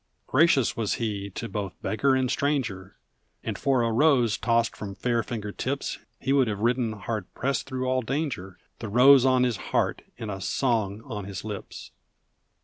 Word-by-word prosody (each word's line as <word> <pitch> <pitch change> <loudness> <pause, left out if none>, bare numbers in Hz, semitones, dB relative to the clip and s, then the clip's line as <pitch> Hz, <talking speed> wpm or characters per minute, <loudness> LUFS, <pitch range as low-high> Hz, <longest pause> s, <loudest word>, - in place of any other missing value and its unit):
Gracious 140 -3 +3
was 110 -3 0
he 105 -3 -3
to 110 +4 -5
both 100 -4 -5
beggar 135 +5 +2
and 130 -1 +1
stranger, 120 -11 -1 0.5
And - - -3
for 130 -3 +1
a 115 - +1
rose 125 -3 +4
tossed 115 0 +1
from 100 -2 -7
fair 120 +3 0
finger 110 -3 -5
tips 135 +6 -3 0.2
He 135 - 0
would 135 -3 +4
have 105 -2 -2
ridden 120 -1 +1
hard 105 -1 -5
pressed 135 -1 -1
through 130 -1 -3
all 130 0 +1
danger, 125 - -3 0.2
The 110 - -5
rose 130 +4 +7
on 130 -1 +4
his 120 -4 +1
heart - - -1 0.2
and 110 -2 -5
a 95 -1 -6
song 110 -2 0
on 105 -7 -5
his 95 -2 -6
lips! 105 -3 -7
115 Hz, 175 wpm, -26 LUFS, 105-130 Hz, 0.5 s, rose